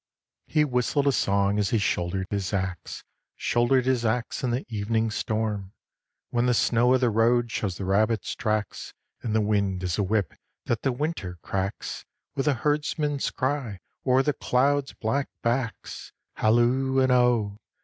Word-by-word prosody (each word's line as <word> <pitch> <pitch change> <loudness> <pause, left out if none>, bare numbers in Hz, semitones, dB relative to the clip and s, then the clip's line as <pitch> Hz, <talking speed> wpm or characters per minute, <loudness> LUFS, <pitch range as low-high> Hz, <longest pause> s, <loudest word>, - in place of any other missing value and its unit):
IV. - - -25
He 150 -1 +5
whistled 130 +2 0
a 140 - +4
song 100 -3 +1
as 100 - +1
he 115 - +2
shouldered 95 -2 -1
his 100 -1 -2
axe, 95 -3 -3 0.3
Shouldered 120 +2 +2
his 130 -2 +1
axe 120 +4 -1
in 125 - +1
the 120 +3 -1
evening 110 0 -1
storm: 105 -2 -2 0.6
"When 120 0 +1
the 125 - +3
snow 120 +3 +3
of 130 - +1
the 125 -2 +3
road 115 +2 +2
shows 100 -6 -2
the 95 - -4
rabbit's 110 +4 +1
tracks, 110 -2 -3 0.3
And 110 -2 -2
the 110 - +3
wind 100 -3 0
is 90 +2 -1
a - - +3
whip 100 -4 0 0.3
that 115 -2 -1
the 135 - +1
Winter 125 - -3
cracks, 95 +1 -3 0.3
With 135 +1 -2
a 145 - +3
herdsman's 150 +1 0
cry, 130 -7 -2 0.2
o'er 130 0 +3
the 150 - +1
clouds' 135 +3 +1
black 135 +5 -1
backs, 120 -1 -2 0.2
Halloo 120 +4 +2
and 130 -1 +3
oh! 120 -5 +2
115 Hz, 165 wpm, -26 LUFS, 105-130 Hz, 0.6 s, He